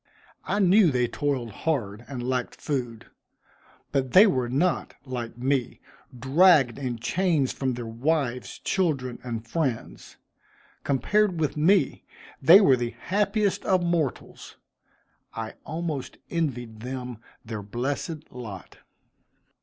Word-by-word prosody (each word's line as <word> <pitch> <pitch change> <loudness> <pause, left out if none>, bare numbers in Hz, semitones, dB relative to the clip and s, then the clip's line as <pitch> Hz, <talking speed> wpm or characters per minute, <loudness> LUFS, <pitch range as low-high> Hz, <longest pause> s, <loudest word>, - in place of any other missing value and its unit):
I - - -1
knew 195 -1 +5
they 125 -3 +1
toiled 130 -4 -2
hard 115 -5 -2
and 125 -3 -5
lacked 125 -1 -2
food; 120 -6 -3 0.9
but 135 -2 -1
they 195 +4 +9
were 130 - +1
not, 160 +7 0
like 120 -3 -5
me, 130 0 -1 0.4
dragged 135 -1 +4
in 125 -3 -3
chains 155 +3 +1
from 130 -2 -2
their 120 -1 -5
wives, 125 +2 -1
children 140 -10 -1
and 115 -2 -5
friends. 130 -4 -3 0.7
Compared 175 - +1
with 155 -3 0
me, 175 +6 +2 0.4
they 170 +8 +9
were 140 -11 +5
the 120 -1 -3
happiest 205 +1 0
of 185 -2 +2
mortals. 170 -6 -2 0.8
I 110 -1 -5
almost 160 -4 -4
envied 120 -10 -2
them 125 -1 -6 0.3
their 110 -2 -5
blessed 140 - -4
lot. 110 -7 -9
135 Hz, 120 wpm, -26 LUFS, 120-165 Hz, 0.9 s, they